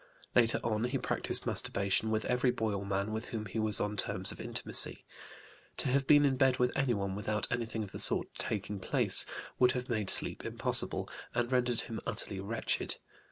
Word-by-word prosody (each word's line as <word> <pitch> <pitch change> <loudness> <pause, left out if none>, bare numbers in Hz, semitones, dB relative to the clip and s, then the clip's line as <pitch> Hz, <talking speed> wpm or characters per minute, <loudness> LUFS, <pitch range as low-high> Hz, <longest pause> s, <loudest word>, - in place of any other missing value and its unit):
Later 115 -2 +2
on 110 0 -1
he 130 +2 -2
practised - - +2
masturbation 100 +2 0
with 110 0 -2
every 125 +1 0
boy 110 -3 -2
or 100 0 -4
man 100 +2 -2
with 110 +2 -5
whom 110 -2 -6
he 105 +3 -5
was 110 -1 +4
on 105 0 -3
terms 100 - +3
of - - -9
intimacy; - - 0 0.7
to - - -1
have 135 +1 0
been 145 -1 +5
in 135 -2 0
bed 130 -1 +2
with 125 0 -1
anyone 105 -8 -1
without 105 +1 +2
anything 115 -2 -3
of 100 - -10
the - - -7
sort - - +2
taking 105 -1 -4
place - - +3 0.3
would 125 0 +4
have 125 -1 -5
made 110 -4 -2
sleep - - +1
impossible, - - +1 0.3
and 120 +1 -2
rendered 125 -2 0
him 115 - -7
utterly 105 -2 +3
wretched. 110 +4 -1
115 Hz, 190 wpm, -31 LUFS, 105-125 Hz, 0.7 s, been